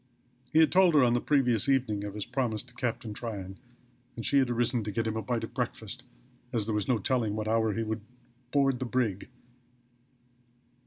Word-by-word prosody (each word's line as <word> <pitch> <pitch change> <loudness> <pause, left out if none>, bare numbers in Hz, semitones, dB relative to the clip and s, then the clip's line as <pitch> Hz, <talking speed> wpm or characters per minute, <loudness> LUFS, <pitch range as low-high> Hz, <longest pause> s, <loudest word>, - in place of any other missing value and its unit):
He - - +1
had 160 -2 +6
told 185 -3 +5
her 140 - +7
on 120 -1 +4
the 120 - +1
previous 130 -5 +2
evening 120 -7 +1
of 100 0 -6
his 105 - -3
promise 120 -5 -1
to 125 -1 -16
Captain 120 -3 -3
Tryon, 100 -4 -6 0.6
and 115 - -5
she 140 - +4
had 130 -2 +2
arisen 120 0 0
to 105 - -3
get 115 +3 -1
him 110 0 -1
a 110 - -1
bite 120 0 -2
of - - -6
breakfast, - - -4 0.5
as 115 -4 0
there 110 - -2
was 105 -1 -1
no 125 - +3
telling 110 0 0
at - - -3
what 110 0 -3
hour 110 -1 +2
he 115 - -1
would 110 0 -3 0.5
board 135 -2 +2
the 130 - -2
brig. 120 -5 -1
115 Hz, 210 wpm, -29 LUFS, 110-130 Hz, 0.6 s, her